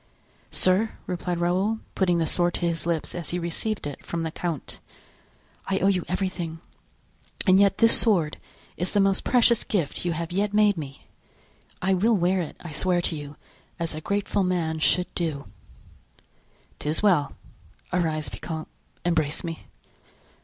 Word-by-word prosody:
"Sir," 190 +4 +2
replied 180 -1 -2
Raoul, 185 +6 +1
putting 180 -3 +2
the 165 - +1
sword 175 +2 +2
to 175 - -1
his 170 0 -1
lips 165 -2 -1
as 175 -3 -4
he 175 - -1
received 180 +5 -2
it 145 -2 -6
from 170 -1 -3
the 160 - -2
count, 165 -4 -4 0.9
"I 195 - +1
owe 195 - +3
you 185 -3 +1
everything 180 -3 -3 0.9
and 185 0 +6
yet 200 -1 +4
this 230 0 +6
sword 175 -10 +2 0.4
is 180 +1 -1
the 205 - +3
most 195 -1 +3
precious 240 -2 +4
gift 170 -9 -2
you 175 -1 0
have 165 +1 -4
yet 205 +3 0
made 210 -1 +5
me. 140 -4 -8 0.8
I 190 +1 +3
will 215 +5 +3
wear 180 +1 +2
it, 160 - -6
I 170 - -8
swear 175 +4 +1
to 170 - 0
you, 145 -1 -7 0.4
as 165 -2 -2
a 155 - -5
grateful 200 +2 0
man 170 -3 0
should 180 +3 +2
do." 155 -5 -2 1.3
"'Tis 155 +6 0
well; 175 -9 +3 0.6
arise, 155 -3 0
vicomte, 160 -2 -6 0.4
embrace 160 -4 +1
me." 165 -2 -6
175 Hz, 160 wpm, -25 LUFS, 160-195 Hz, 1.3 s, and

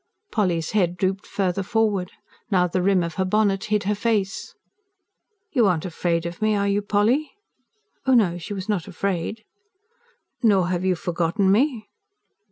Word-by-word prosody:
Polly's 175 -7 0
head 180 -4 +1
drooped 190 +1 -1
further 195 -1 -1
forward; 200 -2 0 0.4
now, 185 -4 +3
the 180 +1 -1
rim 190 -1 +3
of 170 -1 -4
her - - +3
bonnet 195 0 +1
hid 210 -1 0
her 205 +2 +1
face. 210 -2 -1 1.0
"You 245 - +3
aren't 175 -3 0
afraid 170 -1 -1
of 170 +2 -6
me, 215 0 +2
are 200 0 +1
you, 200 +1 +1
Polly?" 210 +9 +1 0.7
Oh, 260 - +5
no, 180 -7 +3
she 205 +4 -6
was 190 +1 -6
not 205 -5 -1
afraid. 195 +3 -3 1.0
"Nor 195 -7 +3
have 180 -1 -1
you 185 -1 +2
forgotten 175 +3 0
me?" 235 +1 +1
195 Hz, 160 wpm, -23 LUFS, 180-210 Hz, 1.0 s, Oh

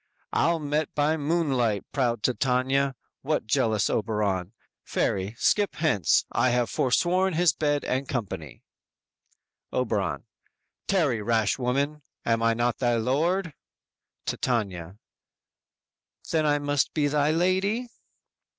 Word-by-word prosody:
"Ill 170 0 +3
met 150 0 -1
by 150 +2 +2
moonlight, 140 - 0
proud 120 -5 0
Titania! 130 +1 +1 0.3
What, 150 -3 -1
jealous 110 -1 +1
Oberon? 105 -4 -1 0.3
Fairy, 95 +3 -1
skip 205 - +2
hence; 130 - +2
I 130 - +2
have 120 -3 +1
forsworn 180 +8 +2
his 170 -2 +4
bed 145 0 0
and 130 +1 -1
company." 95 - -5 1.1
Oberon: 110 -6 -1 0.6
"Tarry, 150 - +1
rash 110 +1 +1
woman; 140 +4 -1 0.2
am 115 0 +1
I 115 0 +3
not 120 0 0
thy 120 -2 +2
lord?" 155 +9 0 0.7
Titania: 95 -7 -2 1.3
_"Then 155 -2 +1
I 145 0 +3
must 145 -1 0
be 150 -2 +2
thy 145 0 +2
lady?" 190 +8 +1
130 Hz, 115 wpm, -26 LUFS, 115-155 Hz, 1.3 s, his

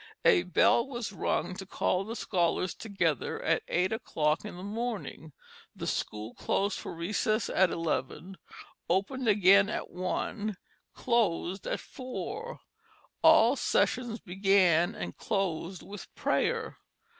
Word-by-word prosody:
A 90 - +6
bell 160 - +3
was 240 -6 -4
rung 190 - -1
to 190 - -7
call 185 -1 0
the 225 +3 -6
scholars 180 -3 0
together 175 - -1
at - - +2
eight 185 +3 +1
o'clock 155 -9 0
in 210 -4 -7
the 180 - -8
morning, 215 -6 -4 0.4
the - - -6
school 105 +2 -3
closed 200 +2 -1
for - - -6
a - - -10
recess 215 +6 0
at 190 -1 +4
eleven, 165 +3 -3 0.5
opened 205 +8 0
again 200 -1 +6
at - - -4
one, 190 +3 -3 0.4
closed 195 -5 0
at - - -1
four; 425 - -6 0.6
all 275 -6 +6
sessions 240 -3 0
began 185 -1 +3
and - - -6
closed 185 -3 -2
with 205 0 -10
prayer. 460 -2 0
195 Hz, 130 wpm, -30 LUFS, 175-225 Hz, 0.6 s, A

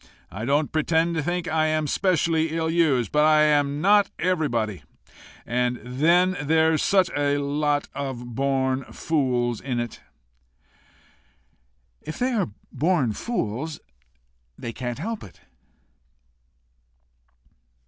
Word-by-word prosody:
I 110 +4 -5
don't 145 +3 +1
pretend 160 +2 +1
to 160 - -1
think 175 +3 -2
I 155 0 +1
am 155 0 0
specially 165 -1 +1
ill 160 0 0
used. 150 -8 +2
But 150 0 +3
I 155 0 +5
am 145 -1 +2
not 205 +2 +4
everybody. 120 - -1 0.6
And 125 +1 0
then 170 +9 +2
there's 160 +1 +2
such 190 -2 +3
a 145 0 +1
lot 145 +1 0
of 125 -4 -5
born 135 0 0
fools 125 -6 -1
in 125 -3 -2
it!" 120 -2 -5 2.0
"If 155 - -7
they 255 +1 0
are 210 - 0 0.2
born 155 -8 +1
fools 150 - -3 0.8
they 115 - -6
can't 120 -1 -4
help 225 +1 -4
it." 95 - -14
150 Hz, 115 wpm, -24 LUFS, 130-165 Hz, 2.0 s, I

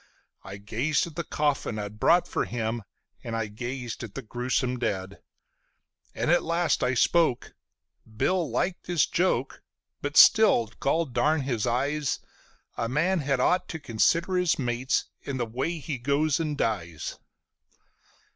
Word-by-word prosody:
I 95 +1 -8
gazed 115 +9 0
at 165 -3 -10
the 170 - -2
coffin 145 -8 -1
I'd 105 0 -6
brought 175 +8 +4
for - - -1
him, 115 -1 -3 0.4
and 115 - -4
I 115 -1 -1
gazed 120 +3 -6
at 110 - -9
the 135 - -5
gruesome 125 +2 -1
dead, 100 -4 -3 1.0
And - - 0
at 175 - +4
last 170 +1 0
I 125 +1 +1
spoke: 160 0 +2 0.6
"Bill 180 +3 +1
liked 175 +10 -2
his 175 -4 +3
joke; 185 +2 0 0.4
but - - -3
still, 210 - +7
goldarn 155 +1 +1
his 125 -4 -1
eyes, 140 +4 0 0.6
A 115 -1 -1
man 165 +8 +1
had 140 -3 0
ought 180 +8 +2
to 160 - -5
consider 170 - +1
his 180 -2 +2
mates 125 -1 0 0.2
in 140 -2 -4
the 120 - -1
way 130 +9 -3
he 145 -3 -5
goes 145 +5 +1
and 155 -3 -2
dies." 85 - -3
130 Hz, 145 wpm, -27 LUFS, 115-160 Hz, 1.0 s, still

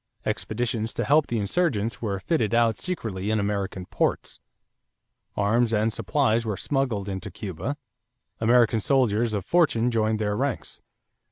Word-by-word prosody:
Expeditions 115 0 -2
to - - -1
help 150 +1 +4
the 120 - -1
insurgents 115 - 0
were 100 -4 -2
fitted 115 - 0
out 115 -2 +3
secretly 110 - -3
in 110 0 +1
American 100 -2 -2
ports. - - -1 1.0
Arms 115 +3 +2
and 110 +1 +1
supplies 115 -5 +1
were 110 -3 -3
smuggled 125 -8 -1
into 95 -1 -4
Cuba. 110 - -5 0.6
American 115 -1 +4
soldiers 115 -4 +2
of 100 -2 -3
fortune 125 -9 +2
joined 110 -1 +1
their 105 -1 -1
ranks. 135 +1 -2
110 Hz, 140 wpm, -25 LUFS, 105-125 Hz, 1.0 s, help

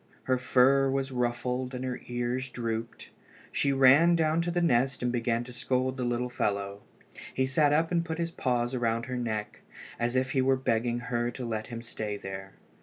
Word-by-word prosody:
Her 130 -1 +1
fur 135 +2 +4
was 135 0 -1
ruffled 125 +1 -1
and 125 +1 -4
her 125 -1 -4
ears 120 +2 -2
drooped. 115 -2 -4 0.4
She 140 - +1
ran 135 +6 +6
down 160 0 +2
to 170 - -2
the 175 +1 0
nest 130 -6 +2
and 125 - +1
began 120 -1 0
to 125 0 -10
scold 130 +1 0
the 130 - -3
little 120 0 0
fellow. 100 -4 -2 0.5
He 130 - +1
sat 145 +2 +3
up 160 +3 +2
and 170 -1 +2
put 160 -1 -4
his 170 0 -2
paws 125 -4 -1
around 115 -1 0
her 130 -1 -4
neck, 110 -4 -3 0.4
as 120 +1 0
if 130 0 +1
he 130 - +2
were 135 +1 +3
begging 120 -1 0
her 120 0 +1
to 125 +1 -6
let 110 -2 -3
him 115 -1 -7
stay 105 -3 -4
there. 95 0 -7
125 Hz, 195 wpm, -29 LUFS, 120-135 Hz, 0.5 s, ran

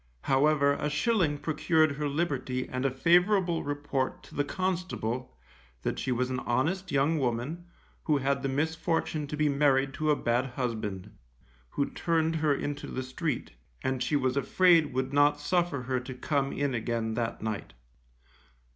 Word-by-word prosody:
However, 140 +1 +3
a 150 +1 -2
shilling 155 -1 +1
procured 155 +1 +2
her 145 +1 -2
liberty 135 -5 -1
and 130 +1 -3
a - - +4
favourable 175 +5 +3
report 145 -2 -2
to - - -15
the 145 - +1
constable 155 - -3 0.5
that - - -2
she 130 - -2
was 125 +1 0
an 130 - -1
honest 160 +11 -1
young 145 +4 +2
woman, 130 +7 -2 0.4
who 150 -2 +3
had 140 0 0
the 135 - -1
misfortune 160 +1 -1
to 150 - -5
be 155 0 +2
married 140 -1 +2
to 155 +2 -1
a 150 - +5
bad 120 0 0
husband, 110 -7 -3 0.6
who 140 - -1
turned 165 -1 0
her 155 -1 +2
into 145 +1 -4
the 130 - -4
street, 130 +2 -3 0.3
and 130 -1 -1
she 150 - 0
was 130 -2 +1
afraid 165 +2 +4
would 130 +1 -2
not 145 0 +4
suffer 165 -3 0
her 130 0 -1
to 125 +1 -8
come 140 +1 0
in 140 -2 -1
again 115 -1 -1
that 115 -1 -3
night. 110 -2 -4
140 Hz, 165 wpm, -29 LUFS, 130-160 Hz, 0.6 s, a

